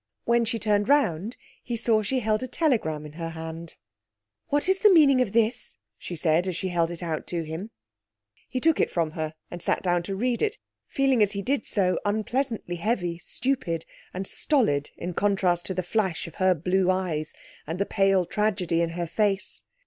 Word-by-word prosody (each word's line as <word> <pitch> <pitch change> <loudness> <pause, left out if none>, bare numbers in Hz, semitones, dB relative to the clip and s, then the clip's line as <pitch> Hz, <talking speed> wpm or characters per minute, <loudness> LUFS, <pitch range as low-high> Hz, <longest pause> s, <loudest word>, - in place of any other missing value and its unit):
When 235 0 +2
she 230 +1 0
turned 210 +1 +1
round 225 - +2 0.2
he 240 -1 -4
saw 220 -1 +2
she 255 +5 0
held 215 0 +1
a 255 - -3
telegram 225 - 0
in 150 - -10
her 165 +1 -5
hand. 165 0 -7 0.7
'What 290 +3 +1
is 380 0 +3
the 420 0 +6
meaning 285 -7 +6
of 245 - 0
this?' 230 - 0 0.2
she 175 - -6
said, 160 +2 +2
as 185 - -2
she 190 - -2
held 170 -2 +1
it 175 0 -6
out 160 -2 -3
to 170 -2 -2
him. 160 +7 -6 0.8
He 255 - -2
took 320 +4 +3
it - - +2
from 165 -3 -1
her 155 0 -4 0.2
and 175 - -6
sat - - 0
down 175 -1 +2
to 195 - -1
read 240 +3 0
it, 430 -1 0 0.3
feeling 270 -4 +2
as 205 0 +3
he 200 0 -3
did 265 0 0
so 185 -3 +1
unpleasantly 220 -2 -1
heavy, 175 -3 -1
stupid, 180 -10 -2 0.3
and 185 +1 -4
stolid 190 - +1
in 180 - -4
contrast 185 -3 +1
to 190 - -3
the 185 - -1
flash 190 -2 -1
of 170 - -9
her 185 -1 +5
blue 180 +3 +1
eyes 175 -5 -1 0.3
and 165 +3 -3
the 200 - 0
pale 195 -3 +2
tragedy 180 -3 0
in 170 - +1
her 175 - -1
face. 195 +2 0
190 Hz, 195 wpm, -26 LUFS, 170-230 Hz, 0.8 s, the